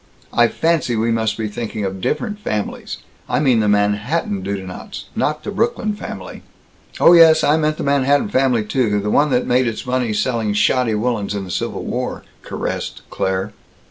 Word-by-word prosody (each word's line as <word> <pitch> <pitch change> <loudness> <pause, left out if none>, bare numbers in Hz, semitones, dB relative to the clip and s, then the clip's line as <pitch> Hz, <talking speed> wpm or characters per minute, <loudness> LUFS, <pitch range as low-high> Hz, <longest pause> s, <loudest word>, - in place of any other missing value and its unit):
I 120 0 +5
fancy 160 -2 0
we 115 +1 +1
must 110 -1 0
be 110 -1 -2
thinking 105 -1 -4
of 95 0 -4
different 210 - -2
families. 105 - -4 0.3
I 125 - +1
mean 130 -6 +3
the 105 - +1
Manhattan 105 - 0
Dudenants, 95 -1 -6
not 155 +1 -1
the - - -4
Brooklyn 215 0 0
family." 205 - -8 0.6
"Oh, 170 - +7
yes, 160 -2 +7
I 150 - +4
meant 155 -1 0
the - - -4
Manhattan 140 0 +2
family, 130 -4 +2
too 105 -3 +1
the 105 +1 -2
one 150 +6 +3
that 125 -2 +1
made 125 0 +2
its 115 - -3
fortune 125 -3 -1
selling 115 -2 0
shoddy 115 +2 +2
woolens 105 -2 -1
in 100 - -3
the 90 - -7
Civil - - -3
War," - - -3 0.2
caressed - - -5
Claire. 95 +2 -2
120 Hz, 175 wpm, -19 LUFS, 105-145 Hz, 0.6 s, Oh